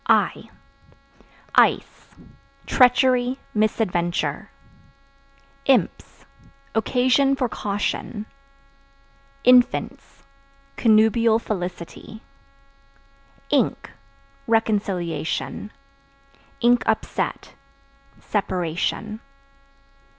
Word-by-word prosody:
I - - +1 1.0
Ice - - +1 0.5
Treachery, 250 0 +3 0.2
misadventure. 185 -5 -1 1.2
Imps 270 -2 0 0.5
Occasion 255 +4 +2
for 260 -2 -1
caution. 210 +1 -3 1.2
Infants 250 0 +2 0.5
Connubial 225 0 +4
felicity. 185 +1 -6 1.3
Ink - - 0 0.6
Reconciliation; 200 -5 -1 1.2
(upset) 220 - -2 0.7
separation. 190 +2 -2
220 Hz, 45 wpm, -22 LUFS, 195-245 Hz, 1.3 s, Connubial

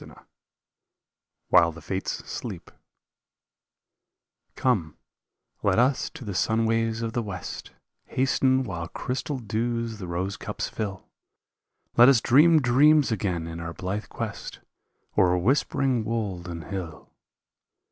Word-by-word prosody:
152 - - -15 1.2
WHILE 85 -2 +6
THE 85 - -10
FATES 95 +4 -3
SLEEP - - -7 1.8
Come, 95 - 0 0.6
let 100 -2 +2
us 130 +3 +2
to 145 -6 -10
the 105 - -4
sunways 115 +2 +1
of 115 -1 -3
the 120 - 0
west, 95 -5 -6 0.4
Hasten, 130 0 +2
while 85 -8 -5
crystal 130 +7 -3
dews 115 0 -2
the 90 - -6
rose 90 +3 -3
cups - - -4
fill. 100 -4 -5 0.9
Let 120 +2 +9
us 135 -4 +6
dream 150 +6 +5
dreams 145 +3 +5
again 90 -6 -1
in 85 0 -6
our 85 0 -5
blithe 95 +4 -4
quest - - -6 0.6
O'er 90 -1 +4
whispering 130 +3 +1
wold 105 -6 -3
and 85 -2 -6
hill. 85 -6 -7
110 Hz, 120 wpm, -26 LUFS, 90-125 Hz, 1.8 s, Let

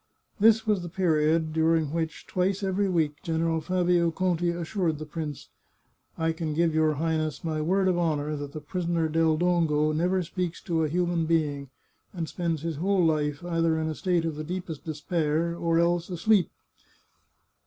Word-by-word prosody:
This 220 +1 +5
was 210 -4 +1
the 175 - -6
period 160 -3 +1
during 160 -2 +2
which, 160 -2 -3
twice 190 +2 -1
every 195 +1 +1
week, 155 -4 0
General 165 0 0
Fabio 175 0 +2
Conti 175 0 0
assured 170 -1 -1
the 155 - -6
prince: 150 -1 -6 0.3
" - - -43 0.3
I 165 0 +1
can 160 -2 -3
give 165 0 +2
your 155 -1 +2
Highness 155 -1 -1
my 155 -2 -2
word 190 +4 +2
of 180 -2 +2
honour 155 -3 0
that 145 -1 -6
the 155 - -6
prisoner 170 +1 -1
Del 160 0 +2
Dongo 160 -3 +2
never 180 +4 +1
speaks 180 +1 -3
to 165 -2 0
a 155 - 0
human 175 0 0
being, 145 -4 0 0.4
and 170 -4 -3
spends 165 -3 -2
his 165 -3 -3
whole 185 +2 +2
life 150 0 0
either 165 -2 +1
in 160 0 -1
a - - -2
state 175 +1 0
of 160 -2 -3
the 155 - -4
deepest 175 -2 -5
despair 160 +1 -1
or 165 -1 0
else 170 +1 +1
asleep." 185 +1 +2
165 Hz, 175 wpm, -27 LUFS, 155-175 Hz, 0.4 s, This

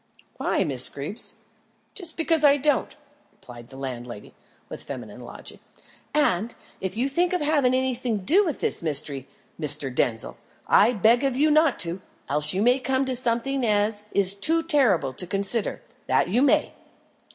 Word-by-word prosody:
"Why, - - 0
Miss 130 -3 +4
Greeb?" 145 +10 -7 0.7
"Just 345 -5 0
because 325 -1 +1
I 285 -1 +5
don't," 290 -1 0 0.4
replied 120 -1 -14
the 135 +1 -14
landlady, 120 -5 -8 0.3
with - - -9
feminine - - -9
logic. - - -10 0.5
"And 230 -7 0 0.2
if 190 +2 -5
you 250 +3 0
think 345 +6 0
of 360 - -1
having 290 -4 +2
anything 255 -3 -1
to 190 - -10
do 380 - +5
with 320 -8 -4
this - - +1
mystery, 145 -4 +1 0.3
Mr. 145 -3 -2
Denzil, 115 -3 -2 0.3
I 220 +4 +4
beg 230 +4 +3
of 270 -2 -1
you 300 +2 +3
not 310 -2 +3
to, 175 +2 -2 0.3
else 150 0 +3
you 195 +3 -1
may 250 +3 +3
come 265 +1 -1
to 260 -1 -1
something 250 +2 0
as 210 -1 0
is 195 -1 +2
too 320 +12 0
terrible 225 - +2
to 180 - -3
consider 200 +4 -2 0.2
that - - +1
you 235 +7 +1
may." 280 - +2
230 Hz, 165 wpm, -24 LUFS, 165-275 Hz, 0.7 s, I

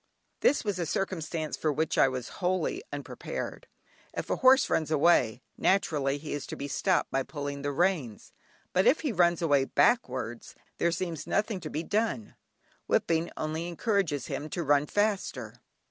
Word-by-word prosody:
This 290 - +3
was 200 -3 -1
a 170 - -1
circumstance 165 -4 -2
for 155 - 0
which 155 +2 0
I - - +5
was 130 -1 -4
wholly 185 - 0
unprepared. - - -6 0.5
If - - -4
a - - +1
horse 260 0 +6
runs 155 -2 0
away, 140 -7 +3 0.2
naturally, 145 -7 +2
he 150 +1 -6
is 145 -2 -4
to - - -5
be 140 - -5
stopped 135 - +1
by 135 - +1
pulling 140 0 -5
the 145 0 -1
reins, 145 - -1 0.4
but 185 +1 +3
if 305 - +4
he 295 - -1
runs 175 -3 +3
away 145 -4 +4
backwards, 130 - 0 0.2
there 170 - +2
seems 170 -2 -4
nothing 210 -1 0
to 160 -3 -6
be 155 - -3
done; 205 - -1 0.5
whipping 165 0 +1
only 155 +2 -3
encourages 175 - 0
him 150 - -4
to 170 +2 -3
run 145 0 +3
faster. 140 - -1
160 Hz, 165 wpm, -29 LUFS, 140-185 Hz, 0.5 s, horse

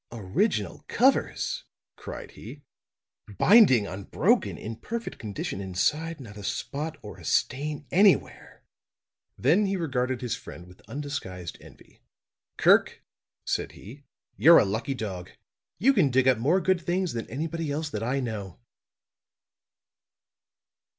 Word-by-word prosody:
"Original 110 - -1
covers!" - - +1 0.3
cried - - -8
he. 140 +6 -11 0.7
"Binding 185 - +6
unbroken; 95 0 0
in 110 +1 -7
perfect 230 - -6
condition 100 -2 -5
inside; 150 - -1
not 105 -5 -11
a 105 - -9
spot 155 +9 -4
or 105 -3 -9
a - - -13
stain 145 - -1
anywhere." 195 +1 +2 0.7
Then 175 - +3
he 195 0 -1
regarded 130 -6 -1
his 125 -2 -2
friend 85 - -11
with 90 +1 -17
undisguised 115 - -6
envy. - - -18 0.6
"Kirk," - - +4 0.4
said - - -2
he, 130 +8 -12 0.3
"you're 165 +2 +8
a - - +5
lucky 110 +7 -2
dog. 95 -6 -5 0.5
You 260 +10 +4
can 185 - +3
dig 130 0 +2
up 130 -4 +4
more 155 +11 +3
good 185 0 +1
things 180 +1 -1
than 115 -1 -5
anybody 160 +4 -3
else 150 +1 -3
that 105 - -4
I 130 +4 -1
know." 105 -7 -5
130 Hz, 130 wpm, -27 LUFS, 105-160 Hz, 0.7 s, you're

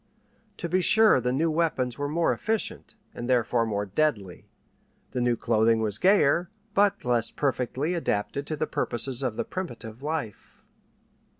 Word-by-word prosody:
To 170 - -4
be 185 +2 +1
sure 220 - +5
the 125 +1 0
new 160 +5 +1
weapons 155 -7 0
were 145 0 -2
more 165 +2 +1
efficient, 220 -1 -3 0.2
and 120 +1 -6
therefore 120 -2 +2
more 105 -1 -2
deadly; 100 -4 -2 0.6
the 125 - -2
new 120 -1 +2
clothing 115 -1 +2
was 110 -1 -1
gayer, 175 -3 +3 0.2
but 205 -3 +2
less 120 -2 +1
perfectly 135 +3 -1
adapted 140 -3 -2
to 155 - -2
the 155 +1 -1
purposes 125 -1 +1
of 125 -5 -2
primitive 125 -11 -6
life. 150 -7 -5
130 Hz, 145 wpm, -26 LUFS, 115-165 Hz, 0.6 s, sure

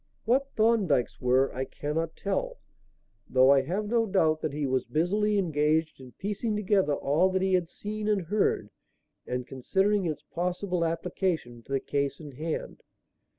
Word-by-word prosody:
What 265 +4 +2
Thorndyke's 215 - +2
were 130 +2 +3
I 130 - -2
cannot 155 +4 -3
tell, - - -2 0.7
though 130 +1 +6
I 140 -1 +6
have 185 +10 -2
no 230 0 +2
doubt 160 -6 +2
that 155 - -1
he 145 0 -2
was 130 -1 +1
busily 205 +6 +1
engaged 160 -3 +1
in 130 -1 -12
piecing 210 +2 -2
together 195 -6 +2
all 155 +8 +2
that 190 0 0
he 190 0 +1
had 180 -2 +2
seen 210 +2 -5
and 205 -3 +1
heard 170 - 0 0.6
and 125 0 -3
considering 190 +10 +1
its 150 -2 -4
possible 180 +2 -2
application 165 -6 -2
to 135 - -5
the 135 - +2
case 140 0 -2
in 150 -3 -9
hand. 155 +5 -5
165 Hz, 160 wpm, -28 LUFS, 140-205 Hz, 0.7 s, though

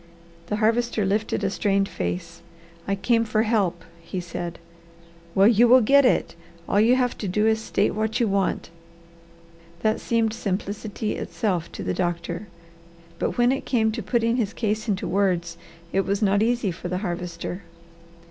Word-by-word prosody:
The 210 - -1
Harvester 225 0 +1
lifted 210 +1 0
a 195 - +1
strained 195 0 +1
face. 170 -3 -4 0.5
"I 200 - +1
came 230 +4 +2
for 215 -1 +1
help," 195 -7 0 0.2
he 170 +2 -5
said. 175 -1 -5 0.8
"Well 195 +1 +6
you 235 +1 +5
will 255 +2 +7
get 280 +5 +5
it! - - +2 0.3
All 205 - +3
you 235 +3 +5
have 250 -1 +1
to 205 - -3
do 210 +4 +1
is 220 0 +3
to 220 - -9
state - - +1
what 220 +3 -1
you 235 - +2
want." 195 -4 -1 1.1
That 220 0 +1
seemed 225 -2 +1
simplicity 210 0 -3
itself 180 -6 -2
to - - -6
the - - -1
doctor. 175 +2 -3 0.7
But - - -1
when 240 +1 +4
it 270 - -1
came 220 -4 +2
to 230 +1 -4
putting 230 +3 +1
his 220 -4 -1
case 215 -1 -2
into 195 -2 -1
words, 180 -3 0 0.4
it 195 - +3
was 200 +2 -1
not 200 0 +3
easy 235 -3 +1
for 175 +1 -7
the 180 +1 -2
Harvester. 175 +1 -4
210 Hz, 170 wpm, -24 LUFS, 185-225 Hz, 1.1 s, will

